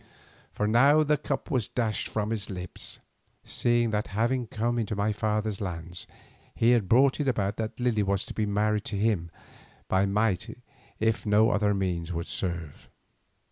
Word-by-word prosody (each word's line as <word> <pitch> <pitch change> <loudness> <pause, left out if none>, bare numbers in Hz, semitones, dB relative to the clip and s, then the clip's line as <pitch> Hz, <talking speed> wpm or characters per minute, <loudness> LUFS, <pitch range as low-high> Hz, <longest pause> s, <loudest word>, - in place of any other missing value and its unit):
For 105 - -2
now 140 +8 +5
the 150 0 +3
cup 145 0 -4
was 125 -7 +1
dashed 110 -4 -1
from 105 0 -2
his 105 -3 -3
lips, 90 -2 -6 0.5
seeing 120 -1 +1
that 105 0 -1
having 120 +2 +1
come 120 +3 -1
into 110 -2 -2
my 105 +1 0
father's 105 -1 -1
lands, 85 -2 -5 0.5
he 115 +1 +4
had 115 -7 +2
brought 130 +4 +4
it 145 - 0
about 105 -5 0
that 110 +2 -4
Lily 120 -4 +1
was 100 -1 0
to - - -7
be 105 -1 -1
married 105 +1 +1
to 105 - -2
him 100 -5 +1 0.6
by 95 +1 +2
might 105 +1 0 0.4
if 110 0 0
no 105 +2 +5
other 105 0 +2
means 90 -3 -2
would 85 0 -3
serve. 85 -7 -5
105 Hz, 170 wpm, -28 LUFS, 100-115 Hz, 0.6 s, now